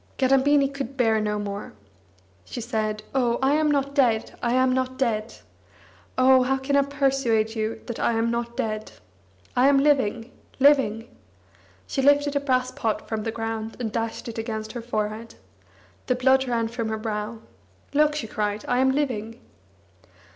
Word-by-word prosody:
Kadambini 275 +1 +4
could 275 -1 -6
bear 225 -3 +3
no 210 0 -1
more. 205 0 -5 0.7
She 165 - -7
said: 215 -2 -2
"Oh, 245 -3 +2
I 270 +2 +2
am 305 0 +2
not 280 -1 0
dead, 240 -6 +2
I 240 0 0
am 255 0 +3
not 260 0 -1
dead. 230 -4 -1 0.8
Oh, 260 0 +6
how 265 +1 +1
can 270 +1 -1
I 280 - +6
persuade 270 -6 +1
you 220 0 -3
that 235 - -6
I - - +1
am 225 +1 +1
not 235 0 -3
dead? 215 -1 -3 0.6
I 250 +2 +5
am 280 0 +5
living, 255 -5 +1 0.3
living!" 260 -5 +3 0.8
She 270 - -2
lifted 285 +1 +3
a - - +3
brass 255 -2 0
pot 215 -3 -2
from 220 -1 -2
the 225 - -3
ground 225 0 -4
and 225 -3 -3
dashed 225 +1 -3
it 230 -1 -5
against 220 -1 -4
her 240 - -6
forehead. 220 -1 -4 0.7
The 250 - +2
blood 265 +1 +3
ran 230 -2 0
from 230 -1 -3
her 220 - -2
brow. 215 0 -4 0.6
"Look!" 300 +1 +3
she 300 - -3
cried, 210 -1 -3
"I 245 - +1
am 265 0 +3
living!" 240 -5 -2
240 Hz, 170 wpm, -24 LUFS, 220-270 Hz, 0.8 s, Oh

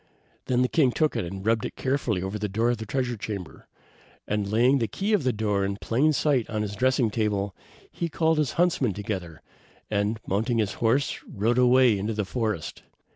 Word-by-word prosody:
Then 125 0 +2
the - - +2
king 135 -3 +3
took 155 +4 +1
it - - -1
and 95 +3 -7
rubbed 115 -1 +2
it - - -5
carefully 130 -8 -1
over 95 +3 -4
the 105 0 -2
door 115 +5 +1
of 120 - -1
the 110 - -6
treasure 125 +1 -1
chamber, 100 -4 -7 0.6
and 105 -1 -1
laying 125 +5 +4
the 115 - 0
key 200 - -2
of 200 -8 +2
the 130 - +2
door 105 -3 0
in 100 0 -2
plain 135 +9 +2
sight 140 -5 +1
on 110 -1 -1
his 105 -1 -4
dressing 130 -1 +2
table, 105 -3 -1 0.4
he 170 - -3
called 160 0 +1
his 150 -4 0
huntsmen 165 - +1
together, 95 -6 -5 0.5
and 105 +2 0
mounting 110 +5 0
his 105 -3 0
horse, 125 +5 +1
rode 115 +4 0
away 125 -4 +5
to 110 +3 -2
the 105 -1 -1
forest. 110 -6 -3
115 Hz, 200 wpm, -26 LUFS, 105-130 Hz, 0.6 s, away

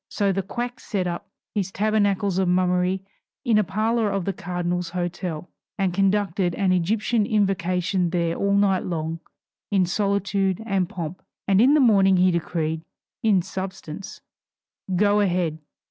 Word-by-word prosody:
So 200 -1 +1
the 195 +1 0
quack 240 +6 -5
set 195 -4 -2
up 175 -1 -4 0.2
his 195 -3 -1
tabernacles 205 -2 +1
of 190 - +2
mummery 180 +1 +1 0.4
in 225 -4 +4
a - - +3
parlor 215 +4 0
of 195 -3 -2
the 195 - -1
cardinal's 175 0 -3
hotel, 175 -1 -4 0.3
and 190 -3 0
conducted 195 -2 +1
an 195 -2 +1
Egyptian 210 +5 +1
Invocation 185 -3 +1
there 170 -1 0
all 200 0 +1
night 200 -2 +3
long 165 -1 -3 0.5
in 195 -3 +3
solitude 195 0 0
and 195 -4 0
pomp; 170 0 -6 0.3
and 195 +1 +4
in 270 +5 +6
the - - +5
morning 195 -7 +5
he 185 +1 +4
decreed 160 -2 -2 0.4
(in 200 -5 +3
substance) 190 -2 -7 0.7
"go 205 +2 +3
ahead." 175 -5 0
190 Hz, 145 wpm, -24 LUFS, 175-205 Hz, 0.7 s, in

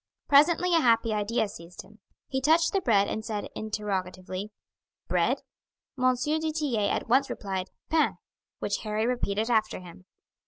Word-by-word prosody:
Presently 335 +5 +5
a - - +5
happy 230 -3 +3
idea 215 +2 0
seized 170 -2 -10
him; 215 +1 -19 0.3
he 265 -1 -2
touched 320 +4 +3
the 390 - +2
bread 205 - +3
and 220 - -3
said 210 -2 -4
interrogatively, 195 -2 -4 0.6
"Bread?" - - +1 0.5
M. 255 -1 +3
du 310 +5 -1
Tillet 270 -10 0
at - - -2
once 270 +4 +3
replied 190 -2 -4 0.2
"Pain," 320 -1 +2 0.4
which - - -1
Harry 215 0 -1
repeated 225 -2 -1
after 215 -2 +1
him. 180 0 -13
220 Hz, 150 wpm, -27 LUFS, 200-275 Hz, 0.6 s, Presently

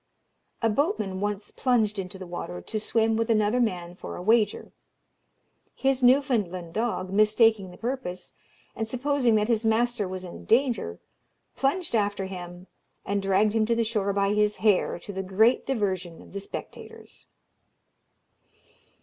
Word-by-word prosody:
A - - +5
boatman 210 - 0
once 205 0 -3
plunged 220 -5 +1
into 190 0 -6
the 185 - -8
water 175 - -6
to 215 - -4
swim 225 +1 +1
with 230 +1 -1
another 215 +2 +2
man 180 -7 -1
for 180 - -8
a - - -6
wager. 220 +1 +2 1.0
His 270 -1 +1
Newfoundland 230 - +2
dog, 215 -4 -2
mistaking 215 -1 +3
the 180 - -13
purpose, 225 -8 -5 0.4
and 220 - -3
supposing 255 -1 +1
that 210 0 +2
his 230 -1 +1
master 225 -1 +1
was 185 0 -6
in 180 - -9
danger, 230 - +1 0.6
plunged 310 +5 -1
after 205 -2 0
him, 180 -1 -8 0.4
and 200 0 -1
dragged 195 +2 +2
him 220 -1 +2
to 235 - +2
the 230 - +2
shore 210 -3 0
by 200 0 +1
his 210 0 +2
hair, 210 -6 +2
to 200 +4 -9
the 190 - -3
great 205 +6 +2
diversion 190 -9 -2
of - - -15
the 200 - -3
spectators. 200 - -10
210 Hz, 150 wpm, -26 LUFS, 190-235 Hz, 1.0 s, A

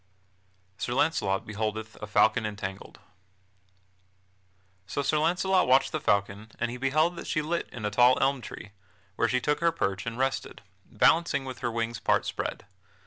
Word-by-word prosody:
[Sidenote: 95 0 -30
Sir 120 - -1
Launcelot 95 -11 +1
beholdeth 110 +1 -4
a 105 - -5
falcon 110 +3 +3
entangled] 100 -2 -6 1.9
So 120 +10 -2
Sir 155 +2 +1
Launcelot 180 +4 +2
watched 130 +1 +4
the - - -2
falcon, 100 +2 0
and 120 0 -1
he 125 - -6
beheld 155 +7 +1
that - - -7
she 155 - 0
lit 170 +3 -2
in 110 -3 -6
a 105 - -1
tall 125 +4 +5
elm 135 -1 +1
tree, 105 - -9 0.4
where 115 - +1
she 125 - +2
took 150 +3 0
her 170 0 +3
perch 100 - -2
and 115 0 -4
rested, 135 +1 -2 0.2
balancing 160 -4 +2
with 130 -2 -7
her 120 - -1
wings 115 -1 -3
part - - +1
spread. - - -4
115 Hz, 170 wpm, -28 LUFS, 100-140 Hz, 1.9 s, tall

